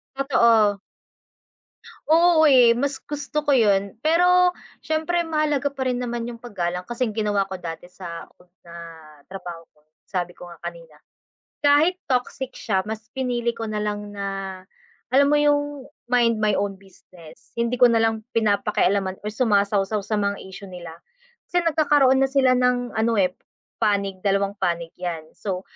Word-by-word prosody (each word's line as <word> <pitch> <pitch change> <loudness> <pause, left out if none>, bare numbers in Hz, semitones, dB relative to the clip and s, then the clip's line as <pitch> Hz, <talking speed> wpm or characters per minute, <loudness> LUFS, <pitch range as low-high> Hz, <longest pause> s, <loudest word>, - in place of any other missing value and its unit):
Totoo. 230 -7 +3 1.3
Oo 335 0 +5
eh, 250 -6 +6
mas 275 +2 -2
gusto 295 +1 -4
ko 290 - +4
yun. 200 -4 +2
Pero 360 +3 +4 0.3
siyempre 320 +2 0
mahalaga 300 -3 0
pa 265 -2 -3
rin 250 0 -1
naman 235 -1 -3
yung 240 - -6
paggalang. 180 -6 -3
Kasi 240 +4 -2
ang 215 - -6
ginawa 205 -3 0
ko 190 - -6
dati 170 -1 -7
sa 175 -2 -9
old 180 0 -25 0.2
na 170 - -12 0.5
trabaho 175 -1 -9
ko, - - -32 0.2
sabi 175 -1 -4
ko 175 -1 -11
nga - - -13
kanina, 170 -2 -9 0.7
kahit 295 +5 +4 0.2
toxic 255 +1 -1
siya 195 -5 0
mas 220 +2 -7
pinili 240 -2 -1
ko 230 - -8
na 215 - -2
lang 210 0 -3
na, 200 -1 -5 0.9
alam 280 +1 +5
mo 295 - +4
yung 290 -2 +1 0.2
mind 230 -3 +2
my 210 -1 +2
own 200 0 -1
business, 180 -4 -18
hindi 235 +1 -1
ko 250 - +7
na 230 -1 +3
lang 225 -1 -1
pinapakialaman 200 -3 +1
or 210 - -3
sumasawsaw 205 -2 +1
sa 215 +2 -2
mga 200 0 -1
issue 195 +1 -10
nila. 175 -3 -10 0.5
Kasi 355 0 0
nagkakaroon 295 -5 +3
na 270 - +4
sila 265 -2 +3
ng 250 -1 +1
ano 225 +1 +2
eh, 185 -4 +1 0.4
panig. 200 -3 0
Dalawang 200 +1 0
panig 170 -3 -1
'yan, 165 -3 -5
so, 185 -3 -5
220 Hz, 160 wpm, -23 LUFS, 195-265 Hz, 1.3 s, ko